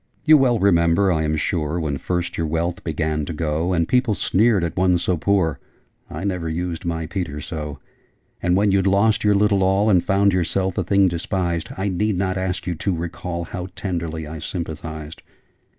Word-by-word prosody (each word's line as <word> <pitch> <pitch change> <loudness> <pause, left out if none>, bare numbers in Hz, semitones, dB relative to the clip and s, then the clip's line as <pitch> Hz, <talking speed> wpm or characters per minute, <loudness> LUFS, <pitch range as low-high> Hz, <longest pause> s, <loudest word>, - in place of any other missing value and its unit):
'You 155 -1 +8
well 130 -5 +4
remember, 95 -1 +3
I 80 -2 +1
am 80 0 0
sure, 80 +1 -1
When 75 -4 -2
first 90 -1 -2
your 85 - -1
wealth 85 +4 -2
began 80 -1 -1
to 85 - -5
go, 80 +2 -1
And 85 -2 +1
people 125 -4 +2
sneered 105 -1 +2
at 85 0 -2
one 90 -1 +3
so 90 +1 0
poor, 85 -3 +1 0.5
I - - -6
never 90 -5 -2
used 85 +1 -3
my 80 -1 -2
Peter 85 -4 -4
so! 75 -1 -6 0.6
And 90 0 +2
when 100 +1 +3
you'd 100 0 +2
lost 100 +2 +3
your 105 -1 +4
little 100 -1 +3
all, 95 +3 +3
And 90 -3 +4
found 100 -1 +3
yourself 95 +1 0
a - - +1
thing 100 +2 +3
despised, 85 -1 -2
I 95 +1 -1
need 100 +1 0
not 95 0 0
ask 95 -2 -2
you 90 - -1
to 90 +3 -2
recall 85 +1 -4
How 90 +2 -6
tenderly 85 -4 -3
I 80 +1 -7
sympathised! 80 -2 -6
90 Hz, 190 wpm, -22 LUFS, 80-95 Hz, 0.6 s, You